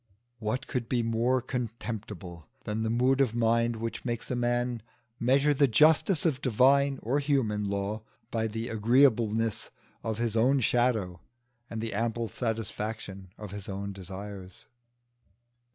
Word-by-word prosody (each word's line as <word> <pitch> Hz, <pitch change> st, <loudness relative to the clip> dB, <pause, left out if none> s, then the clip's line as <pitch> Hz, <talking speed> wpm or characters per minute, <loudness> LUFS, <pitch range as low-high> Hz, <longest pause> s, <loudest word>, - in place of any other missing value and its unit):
What 110 Hz, +3 st, -2 dB
could 120 Hz, -3 st, -3 dB
be 120 Hz, -2 st, +1 dB
more 115 Hz, +2 st, +1 dB
contemptible 110 Hz, -, -5 dB
than 105 Hz, +1 st, -2 dB
the 110 Hz, -, 0 dB
mood 130 Hz, +4 st, +3 dB
of 120 Hz, -4 st, +1 dB
mind 115 Hz, 0 st, +2 dB
which 115 Hz, +1 st, -4 dB
makes 120 Hz, -1 st, -3 dB
a -, -, 0 dB
man 120 Hz, -1 st, 0 dB, 0.4 s
measure 135 Hz, +5 st, +3 dB
the 140 Hz, 0 st, +4 dB
justice 155 Hz, -, +4 dB
of 145 Hz, -5 st, +1 dB
divine 135 Hz, +3 st, +4 dB
or 130 Hz, +6 st, +1 dB
human 130 Hz, -8 st, +1 dB
law 100 Hz, +2 st, -2 dB, 0.3 s
by 110 Hz, -1 st, 0 dB
the 110 Hz, +2 st, -4 dB
agreeableness 115 Hz, -1 st, +2 dB, 0.3 s
of 110 Hz, -1 st, -2 dB
his 115 Hz, -1 st, -1 dB
own 130 Hz, +5 st, +4 dB
shadow 110 Hz, -8 st, +1 dB, 0.5 s
and 115 Hz, -1 st, -4 dB
the 115 Hz, -1 st, -3 dB
ample 115 Hz, +1 st, -1 dB
satisfaction 110 Hz, -4 st, -4 dB
of 105 Hz, -3 st, -8 dB
his 100 Hz, -1 st, -7 dB
own 100 Hz, +1 st, -4 dB
desires? 95 Hz, 0 st, -9 dB
115 Hz, 140 wpm, -29 LUFS, 105-125 Hz, 0.5 s, the